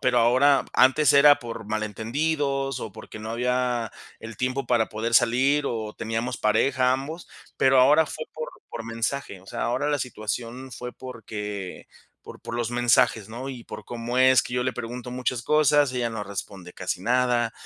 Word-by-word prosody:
Pero 125 -2 +2
ahora 130 +4 +4
antes 130 +3 +5
era 145 +1 +7
por 115 -3 -7
malentendidos, 135 +6 -1
o 110 - -6
porque 110 - -10
no 110 +1 -6
había 125 0 -1 0.3
el 115 -1 -9
tiempo 130 +1 -1
para 120 -3 +2
poder 110 +2 -3
salir, 130 +5 +3
o 110 -4 -3
teníamos 115 +2 -3
pareja, 125 +4 +2
ambos, 145 +6 -5 0.3
pero 135 0 +4
ahora 150 +5 +6
fue 155 - -6
por 155 0 -5 0.2
por 115 -1 -6
mensaje. 115 -2 -3
O 95 - -21
sea, - - -5
ahora 130 +5 0
la 145 -1 +1
situación 120 +2 -5
fue, 125 +1 -7
porque, 105 -6 -7 0.4
por - - -12
por 115 - -7
los 120 -1 -2
mensajes, 120 -3 +2
¿no? 120 +4 -6
Y 125 -3 -8
por - - -9
cómo 120 +1 -4
es 130 -2 +6
que 120 - -6
yo 125 0 0
le 130 - 0
pregunto 125 +2 -6
muchas 125 -1 -2
cosas, 150 -1 +3
ella 120 -2 -1
no 110 -2 -5
responde 95 -2 -7
casi - - -4
nada. 120 0 +1
125 Hz, 175 wpm, -25 LUFS, 115-130 Hz, 0.4 s, era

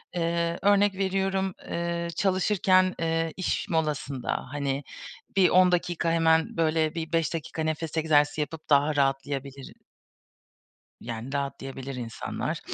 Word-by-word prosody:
Eee, 170 0 0
örnek 205 0 +4
veriyorum, 190 -1 0 0.2
eee, 170 0 -2
çalışırken, 185 -1 +3
eee, 165 0 0
iş 185 - -1
molasında, 150 -5 -2
hani, 140 -1 -2 0.5
bir 190 -2 +6
10 180 0 +5
dakika, 175 -1 0
hemen 165 -1 +2
böyle 160 0 +1
bir 165 -1 -4
5 165 0 +1
dakika 160 0 -4
nefes 160 0 -3
egzersizi 150 -1 +3
yapıp 155 +1 -6
daha 145 +1 +4
rahatlayabilir 135 -1 -2 1.3
yani, 120 +3 -6
rahatlayabilir 135 -1 -4
insanlar. 120 -2 -4
160 Hz, 120 wpm, -27 LUFS, 145-175 Hz, 1.3 s, bir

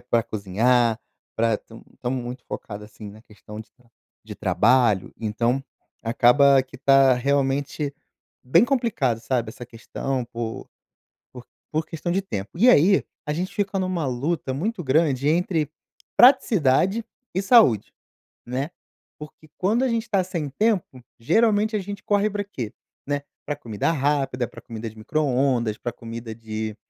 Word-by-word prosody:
Tempo 120 - -26
para 115 -1 +3
cozinhar, 110 +4 +1 0.4
para 115 -1 +2
tam 115 0 -15
estamos 125 0 -3
muito 125 +1 -7
focado 105 -1 -7
assim 105 -1 -11
na 110 +2 -15
questão 105 0 -11
de 110 - -13
tra 120 -1 -28 0.4
de - - -7
trabalho, 115 -4 +2
então, 115 +4 0 0.4
acaba 130 +4 +5
que 130 - -14
tá 135 -1 +5
realmente, 140 +2 0 0.5
bem 165 - +4
complicado, 230 - 0
sabe? 120 -2 -1
Essa 120 +1 -10
questão, 125 +2 -4
por 115 -1 -6 0.6
por 125 -1 -11 0.3
por 155 +1 -1
questão 165 +2 -4
de 190 - +1
tempo. 100 - -5
E 240 - +5
aí, 195 -1 +5 0.2
a 150 - -1
gente 180 +5 -3
fica 200 -1 -1
numa 185 -5 -1
luta 135 +3 -2
muito 185 +7 -2
grande 140 -1 +2
entre 160 -2 +1 0.5
praticidade 210 - +4 0.3
e 190 - +1
saúde, 195 - +5 0.5
né? 130 +6 -3 0.5
Porque 150 +1 -12
quando 220 +8 +2
a - - +1
gente 230 -1 0
está 200 -5 +1
sem 170 -5 -4
tempo, 185 - -1 0.2
geralmente 215 - +2
a 210 - -1
gente 200 +1 -7
corre 205 +1 +2
pra 205 0 -3
quê, 125 - -6 0.3
né? 145 0 -1 0.2
Pra 145 -1 -2
comida 115 0 -2
rápida, 135 -4 0
pra - - -12
comida 115 0 -6
de 110 - -19
microondas, 125 -3 0
pra 120 - -4
comida 115 -1 -8
de 110 -1 -5
135 Hz, 155 wpm, -24 LUFS, 115-175 Hz, 0.6 s, acaba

